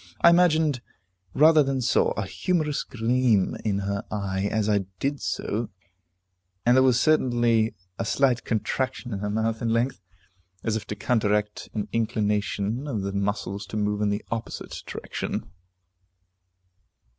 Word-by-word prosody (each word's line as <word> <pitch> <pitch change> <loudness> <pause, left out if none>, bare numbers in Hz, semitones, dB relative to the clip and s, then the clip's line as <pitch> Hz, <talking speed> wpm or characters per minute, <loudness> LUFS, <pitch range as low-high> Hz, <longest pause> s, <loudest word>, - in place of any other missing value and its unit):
I 170 - +8
imagined, 160 -6 +3 0.5
rather 155 +2 +7
than 135 -1 0
saw, 125 0 +2
a 100 - -3
humorous 155 - -1
gleam 120 -3 +1
in 100 -2 0
her 100 +1 -2
eye, 100 -1 -2
as 110 -1 0
I 100 -2 +2
did 140 +1 -1
so, 110 +3 -2 1.0
and 120 +1 +5
there 130 - +6
was 130 -2 +4
certainly 120 -7 +3 0.2
a 115 - -1
slight 125 +1 +2
contraction 125 +2 -2
of 100 - -3
her 105 +1 -2
mouth 110 +1 -1
in 115 - 0
length, 115 +2 0 0.6
as 110 - 0
if 110 -2 -3
to 105 - -4
counteract 105 -1 0
an 105 - -2
inclination 110 +2 -1
of 110 -8 -2
the 100 0 -3
muscles 100 0 -2
to 105 - -5
move 105 0 0
in 105 - +2
the 100 +1 -2
opposite 115 0 -5
direction. - - -5
115 Hz, 145 wpm, -25 LUFS, 105-130 Hz, 1.0 s, I